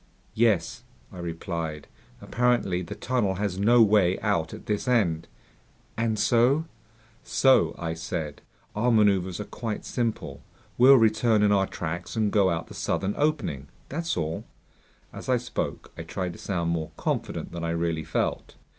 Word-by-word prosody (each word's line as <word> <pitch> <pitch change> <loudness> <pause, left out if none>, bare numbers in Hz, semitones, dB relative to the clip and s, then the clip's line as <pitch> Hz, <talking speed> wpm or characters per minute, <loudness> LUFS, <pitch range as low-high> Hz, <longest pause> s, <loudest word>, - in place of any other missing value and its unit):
"Yes," 110 -7 +1 0.3
I 90 - -9
replied. 85 -3 -4 0.3
"Apparently 120 -7 +1
the 85 - -7
tunnel 115 -7 0
has 100 -1 -2
no 115 +3 +6
way 100 -4 +3
out 85 -7 0
at - - -10
this 105 +4 -2
end." 95 -10 +1 0.7
"And 115 -1 0
so... 125 +9 +3 0.3
?" 110 0 -31
"So," 135 -1 +3
I 80 -1 -3
said, 80 -2 -5 0.3
"our 120 +4 +2
maneuvers 100 -5 +3
are - - -2
quite 110 -3 -5
simple. 115 -3 -3 0.3
We'll 130 +3 +8
return 110 -2 +3
in 105 - +4
our 95 -1 +3
tracks 85 +4 -5
and 110 -2 +1
go 100 -3 +4
out 85 -2 -2
the - - -12
southern 100 +1 -1
opening. 140 - -1 0.2
That's 165 - -2
all." 80 0 -2 0.7
As - - -8
I 125 - +4
spoke, 120 - -4
I - - -6
tried 90 -2 -4
to - - -13
sound 85 -4 -1
more 80 -2 -2
confident - - -3
than 85 -1 -6
I 85 - -1
really 85 -1 -1
felt. 80 - -2
100 Hz, 160 wpm, -26 LUFS, 85-115 Hz, 0.7 s, We'll